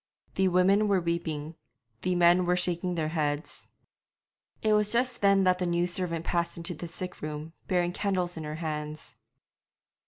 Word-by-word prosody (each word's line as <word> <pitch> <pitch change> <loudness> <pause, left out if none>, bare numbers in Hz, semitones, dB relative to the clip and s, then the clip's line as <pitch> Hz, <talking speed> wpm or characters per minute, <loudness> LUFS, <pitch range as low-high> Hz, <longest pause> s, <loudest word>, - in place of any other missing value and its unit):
The 190 - +2
women 190 +4 +4
were 200 -2 +3
weeping; 165 -3 -3 0.5
the 180 0 0
men 175 +1 +5
were 180 - +3
shaking 180 0 -1
their 155 -2 -1
heads. 150 -1 -3 1.0
It 215 -1 +3
was 210 0 +3
just 245 0 0
then 200 -1 +5
that 185 -1 +3
the 180 - 0
new 175 0 +1
servant 175 -2 -2
passed 170 -1 -1
into 170 +1 -5
the 170 +2 -7
sick 180 +2 -5
room, 155 +1 -5
bearing 175 -1 +1
candles 185 -3 -1
in 160 - -6
her 150 0 -5
hands. 155 -2 -5
175 Hz, 165 wpm, -28 LUFS, 165-185 Hz, 1.0 s, men